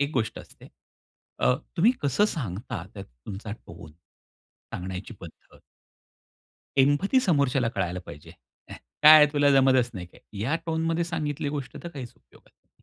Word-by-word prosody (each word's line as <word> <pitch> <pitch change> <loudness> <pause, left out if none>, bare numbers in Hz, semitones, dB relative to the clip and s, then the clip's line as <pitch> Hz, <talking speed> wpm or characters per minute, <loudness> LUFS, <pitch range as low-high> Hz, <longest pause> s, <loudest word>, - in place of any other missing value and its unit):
एक 140 0 0
गोष्ट 110 -3 -2
असते - - -14 0.7
अ, 65 +1 +3 0.2
तुम्ही 200 +8 +5
कसं 145 +9 +2
सांगता, 115 - -4
त्यात 100 -2 -8
तुमचा 95 - -9
टोन, 85 -7 -12 0.8
सांगण्याची 90 +1 -6
पद्धत. - - -14 1.2
एम्पथी 145 - +3
समोरच्याला 140 - +1
कळायला 90 -2 -2
पाहिजे. 75 0 -11 0.4
"ह्या, - - -9 0.3
काय 155 +1 +11
आहे 150 -1 +7
तुला 145 -1 +3
जमतच 130 -3 +4
नाही 90 -3 -6
काय" - - -21 0.2
ह्या 135 +10 0
टोनमध्ये 165 +1 0
सांगितली 155 -3 -3
गोष्ट 140 -2 -5
तर 170 - -6
काहीच 135 -8 -9
उपयोगात - - -24
नाही. - - -37
135 Hz, 145 wpm, -26 LUFS, 100-155 Hz, 1.2 s, काय